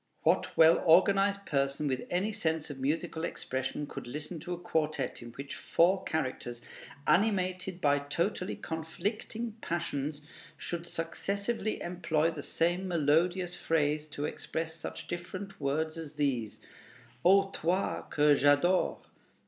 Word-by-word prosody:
What -, -, +2 dB
well 160 Hz, +1 st, +7 dB
organized 195 Hz, +4 st, +4 dB
person 140 Hz, +1 st, 0 dB
with 130 Hz, -2 st, -2 dB
any 185 Hz, +5 st, +1 dB
sense 160 Hz, -5 st, -1 dB
of 135 Hz, -, -8 dB
musical 160 Hz, +3 st, -1 dB
expression 130 Hz, -1 st, -3 dB
could 130 Hz, -, -8 dB
listen 150 Hz, +6 st, -5 dB
to 175 Hz, -, -7 dB
a -, -, -4 dB
quartet 155 Hz, -6 st, -1 dB
in 120 Hz, -, -8 dB
which 140 Hz, +2 st, -7 dB
four 185 Hz, +3 st, +2 dB
characters, 130 Hz, -5 st, -2 dB, 0.5 s
animated 185 Hz, -2 st, +1 dB
by 145 Hz, -3 st, +3 dB
totally 170 Hz, +7 st, -1 dB
conflicting 210 Hz, +8 st, -4 dB
passions, 150 Hz, -3 st, -2 dB, 0.3 s
should 170 Hz, 0 st, -5 dB
successively 200 Hz, +7 st, -2 dB
employ 165 Hz, -2 st, 0 dB
the 155 Hz, -3 st, -6 dB
same 175 Hz, +5 st, 0 dB
melodious 175 Hz, +2 st, +2 dB
phrase 150 Hz, -1 st, +1 dB
to 145 Hz, -1 st, -4 dB
express 160 Hz, +1 st, -3 dB
such 160 Hz, -, -6 dB
different 185 Hz, +2 st, -6 dB
words 155 Hz, +4 st, -1 dB
as 155 Hz, -2 st, -7 dB
these: 130 Hz, -7 st, -1 dB, 0.6 s
"O, 195 Hz, +2 st, +5 dB
toi 180 Hz, +3 st, 0 dB
que 150 Hz, 0 st, +5 dB
j'adore!" 145 Hz, +6 st, +3 dB
165 Hz, 130 wpm, -31 LUFS, 145-185 Hz, 0.6 s, well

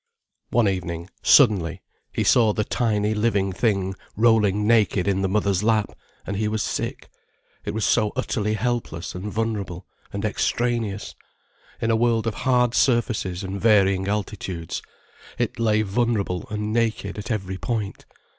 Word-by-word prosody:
One 120 Hz, -2 st, +3 dB
evening, 85 Hz, -2 st, -3 dB
suddenly, 95 Hz, -, +4 dB, 0.3 s
he -, -, -1 dB
saw 110 Hz, -3 st, +4 dB
the 105 Hz, -, 0 dB
tiny, 105 Hz, -2 st, 0 dB
living 105 Hz, -3 st, +1 dB
thing 95 Hz, -3 st, 0 dB, 0.2 s
rolling 105 Hz, -3 st, +3 dB
naked 105 Hz, -4 st, +3 dB
in 95 Hz, -1 st, +1 dB
the 95 Hz, -, 0 dB
mother's 100 Hz, -2 st, +1 dB
lap, 110 Hz, -1 st, +2 dB, 0.3 s
and 100 Hz, -, -3 dB
he 105 Hz, +1 st, 0 dB
was 110 Hz, 0 st, -1 dB
sick, -, -, -3 dB, 0.6 s
it -, -, -3 dB
was 110 Hz, -, 0 dB
so 105 Hz, -1 st, +2 dB
utterly 110 Hz, -4 st, -1 dB
helpless 110 Hz, -7 st, -2 dB
and 95 Hz, +3 st, -5 dB
vulnerable 100 Hz, -5 st, -3 dB, 0.3 s
and 100 Hz, +1 st, -3 dB
extraneous; 110 Hz, -1 st, -1 dB, 0.7 s
in 115 Hz, -, 0 dB
a -, -, +3 dB
world 115 Hz, -1 st, +2 dB
of 115 Hz, -, 0 dB
hard 125 Hz, -1 st, +2 dB
surfaces 115 Hz, -8 st, +1 dB
and 95 Hz, +1 st, -5 dB
varying 100 Hz, -3 st, +4 dB
altitudes, 95 Hz, -5 st, -3 dB, 0.6 s
it -, -, -2 dB
lay 110 Hz, -2 st, +2 dB
vulnerable 105 Hz, -2 st, -1 dB
and 105 Hz, 0 st, -3 dB
naked 115 Hz, -3 st, -1 dB
at 105 Hz, -, -7 dB
every 95 Hz, -4 st, -3 dB
point. 110 Hz, -5 st, -3 dB
105 Hz, 145 wpm, -23 LUFS, 95-115 Hz, 0.7 s, suddenly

